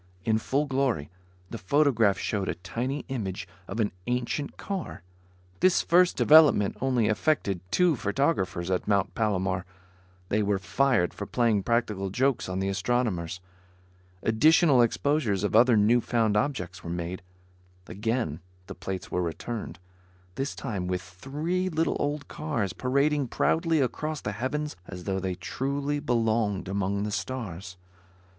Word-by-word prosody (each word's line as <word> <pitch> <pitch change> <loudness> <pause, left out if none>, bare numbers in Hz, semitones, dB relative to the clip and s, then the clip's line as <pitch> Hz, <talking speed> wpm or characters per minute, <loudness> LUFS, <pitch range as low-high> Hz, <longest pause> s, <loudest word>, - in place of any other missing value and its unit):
In 110 -1 +2
full 140 +6 0
glory, 130 - -1 0.4
the 115 - -5
photograph 115 -2 +3
showed 100 -3 -2
a - - -1
tiny 120 +11 -4
image 100 -9 -4 0.2
of 100 - -5
an 105 -2 +1 0.2
ancient 125 +4 -2
car. 190 - -5 0.6
This 185 -1 +4
first 180 +1 +4
development 150 -10 +6
only 125 -4 +2
affected 110 - +1
two 180 - +3
photographers 100 - 0
at 90 - -1
Mount 100 -2 +1
Palomar. 95 -4 0 0.7
They 105 - +2
were 100 -1 +1
fired 95 +2 +1
for 100 - -6
playing 115 -4 +2
practical 105 -3 0
jokes 130 +2 0
on 90 - -3
the 95 0 -1
astronomers. 95 -4 -1 0.8
Additional 145 +4 +5
exposures 120 -4 +1
of 105 - 0
other 120 0 +6
newfound 115 0 +3
objects 100 - -2
were 85 - -6
made. 85 +1 -4 0.6
Again 110 - -2 0.3
the - - -8
plates 95 -2 -6
were 90 - 0
returned; 85 0 -4 0.6
this 135 +6 -3
time 100 -8 -4
with 90 0 -2
three 150 - -3
little 165 -1 0
old 145 0 -2
cars 120 - -2
parading 140 +2 +1
proudly 165 +5 +1
across 150 +4 -1
the 105 - -4
heavens 145 +8 -3
as 90 -2 -8
though 95 0 -1
they 95 -1 -2
truly 140 +7 -2
belonged 115 -7 0
among 100 +1 -1
the 105 - -2
stars. 95 -6 -5
115 Hz, 140 wpm, -27 LUFS, 95-140 Hz, 0.8 s, development